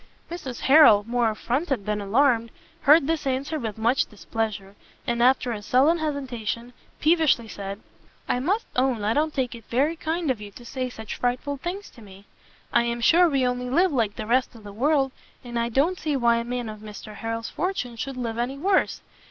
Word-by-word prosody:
Mrs 270 -8 -6
Harrel, 265 -8 +7
more 240 -1 +2
affronted 250 - -2
than 210 -1 -1
alarmed, 230 +2 +2 0.3
heard 300 +1 +6
this 315 -2 -1
answer 275 +4 -1
with 225 -5 -4
much 235 +4 +2
displeasure, 210 -2 -4 0.3
and 235 0 -1
after 250 0 +3
a 215 -3 -4
sullen 275 +10 +3
hesitation, 250 -6 -4 0.3
peevishly 310 -7 +3
said, 200 -1 -6 0.5
"I 245 - +1
must 385 - 0
own 255 -4 +1
I 215 +2 +2
don't 310 +3 +1
take 260 -4 -2
it 230 -1 -10
very 285 +7 +1
kind 320 -1 -1
of 230 -5 -4
you 205 - -7
to 240 - -13
say 255 +1 -3
such 220 -3 -7
frightful 255 +4 -1
things 360 +8 -5
to 235 - -16
me; 195 -1 -14 0.5
I - - +5
am 235 0 -2
sure 340 +8 +5
we 270 -3 +1
only 250 0 -1
live 350 +7 +3
like 225 -7 0
the 215 - -5
rest 250 +2 +1
of 225 - -13
the 205 -1 -9
world, 270 +3 +2 0.3
and 240 -1 -4
I 235 0 0
don't 300 +10 +1
see 305 -3 -1
why 235 -3 +3
a 235 - -1
man 245 0 -4
of 215 -1 -7
Mr 215 0 -10
Harrel's 225 0 -4
fortune 335 -10 -3
should 260 +3 -5
live 230 -2 -3
any 255 +3 -2
worse. 380 +6 +1
250 Hz, 200 wpm, -25 LUFS, 225-285 Hz, 0.5 s, Harrel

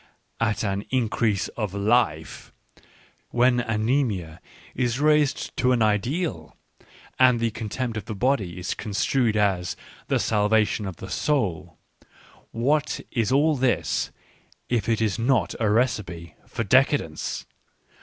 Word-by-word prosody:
at 105 -2 0
an 100 -1 -1
increase 115 -5 0
of 105 -4 -4
life; 100 -6 0 0.8
when 125 +1 +3
anaemia 110 - -1 0.3
is 120 0 -1
raised 150 -1 +2
to 125 0 +2
an 120 -3 +3
ideal 110 - -1 0.6
and 125 -2 +5
the 115 -1 0
contempt 115 +2 -4
of 105 -3 -5
the 110 - -5
body 100 -7 0
is 90 - -3
construed 110 +2 0
as 95 -4 +1 0.2
" - - -23
the - - +2
salvation 105 -1 +1
of 95 - -6
the 95 - -9
soul," 110 - -1 0.7
what 140 +6 0
is 115 -2 0
all 150 +3 +3
this 130 -1 0 0.6
if 120 -2 0
it 115 -1 +1
is 110 0 0
not 115 -6 +1
a 110 -2 +1
recipe 105 - -1
for 115 - -3
decadence 125 - +1
110 Hz, 130 wpm, -24 LUFS, 100-125 Hz, 0.8 s, and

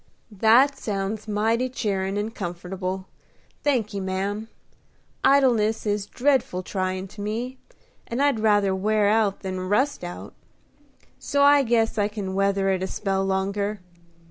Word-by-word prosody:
"That 230 +7 +4
sounds 205 +1 -3
mighty 225 +4 +1
cheerin' 200 -5 -2
and 215 +2 -3
comfortable, 185 +1 -5 0.6
thanky, 225 -8 0
ma'am. 195 +3 -3 0.8
Idleness 235 -6 +3
is 205 -1 -1
dreadful 250 -9 +1
tryin' 185 0 -3
to 205 - -10
me, 235 +5 -4 0.5
and 235 - -3
I'd 280 -5 +2
rather 205 -3 +3
wear 205 +2 +2
out 210 -2 +1
than 185 -1 -4
rust 260 +3 +1
out; 175 0 -7 0.9
so 280 0 +1
I 285 0 +7
guess 225 -3 +1
I 205 - +3
can 205 -3 -5
weather 195 0 +1
it 190 -1 0
a 190 - -1
spell 195 -1 -1
longer. 200 +2 -1
205 Hz, 135 wpm, -24 LUFS, 195-225 Hz, 0.9 s, I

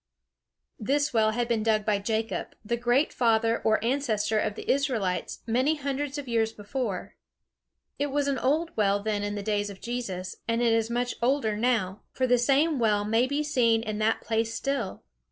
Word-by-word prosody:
This 285 +6 0
well 220 -2 +4
had 235 +2 -1
been 230 -2 +1
dug 215 -1 +1
by 210 -2 +2
Jacob, 220 +2 -2
the 235 - 0
great 245 +5 +1
father 230 -1 +2
or 220 0 +4
ancestor 225 -5 +1
of 210 -1 -1
the - - -8
Israelites, 240 -10 0
many 255 +7 +2
hundreds 285 0 -3
of 285 -2 -6
years 225 -2 +1
before. 210 -2 -4 0.9
It 290 - +1
was 285 0 0
an 275 -1 0
old 315 +5 0
well 200 -2 +2
then 210 -1 -1
in 205 0 -3
the 205 - -4
days 205 -1 0
of 195 -1 -10
Jesus; 195 -7 -4
and 230 0 +1
it 235 -1 +3
is 225 0 +1
much 245 +1 -1
older 240 -3 +1
now; 215 -4 0
for 260 - 0
the 245 -1 +3
same 280 +4 +2
well 210 -3 +2
may 225 +4 +2
be 285 +2 -1
seen 235 -6 +2
in 215 -1 -3
that 215 +1 +1
place 225 0 -1
still. 270 -6 -3
230 Hz, 190 wpm, -27 LUFS, 215-265 Hz, 0.9 s, well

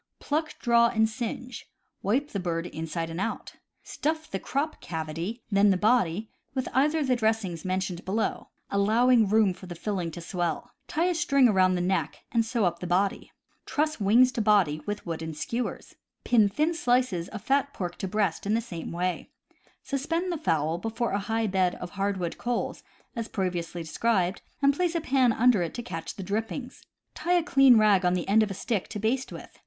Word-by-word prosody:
— - - -55
Pluck, 310 +2 -2
draw, 235 -1 +4
and 220 -1 +2
singe. 240 +1 -6 0.3
Wipe 265 +9 0
the 200 - -2
bird 170 -2 -2
inside 165 0 -4
and 165 +3 -4
out. 225 - -4 0.3
Stuff 315 +1 -3
the 195 - -2
crop 290 +8 -2
cavity, 165 +8 -5
then 200 +1 +5
the 190 - +3
body, 215 -2 +1 0.2
with 260 -1 -1
either 295 +5 +3
of 305 - +1
the 255 - +3
dressings 220 -7 -1
mentioned 185 -1 -2
below, 215 +4 -2 0.2
allowing 220 +2 +4
room 215 -3 +4
for 185 +1 -12
the 175 - -7
filling 180 -1 -2
to 165 - -8
swell. 170 -2 -3 0.2
Tie 325 +3 0
a 360 - +2
string 280 -6 +4
around 185 -4 +3
the 180 - 0
neck, 185 +2 -1
and 230 -1 +3
sew 225 -2 0
up 170 -1 0
the 180 - -5
body. 190 +3 0 0.4
Truss 310 -1 0
wings 235 +6 +5
to 240 - -2
body 195 -8 +3
with 205 0 -4
wooden 160 -1 -4
skewers. 235 +10 -4 0.3
Pin 220 -4 +4
thin 305 +11 +1
slices 245 - +1
of 215 0 -8
fat 280 +3 +1
pork 180 -8 -4
to 195 - -2
breast 195 -3 -1
in 220 +2 +2
same 180 -8 -6
way. 180 +1 -2 0.5
Suspend 330 +6 -2
the 340 - -2
fowl 160 - 0
before 225 +4 -2
a 200 - 0
high 225 +3 -1
bed 185 -3 +1
of 180 - -8
hardwood 195 -3 -2
coals, 245 -1 -2 0.3
as 230 -1 -3
previously 175 -3 -3
described, 185 +2 0 0.2
and 280 0 +5
place 350 +1 0
a 335 - +1
pan 260 -4 +3
under 230 -3 +4
it 170 - -3
to 240 - -4
catch 165 -9 -6
drippings. 220 +6 -4 0.3
Tie 350 - -1
a 350 -2 +3
clean 270 -7 +6
rag 210 -3 +4
on 180 0 +3
the 180 - -3
end 210 +3 +5
of 215 - +1
a 195 - -5
stick 205 0 -2
to - - -6
baste 235 +5 -1
with. - - -11
210 Hz, 195 wpm, -27 LUFS, 180-250 Hz, 0.5 s, clean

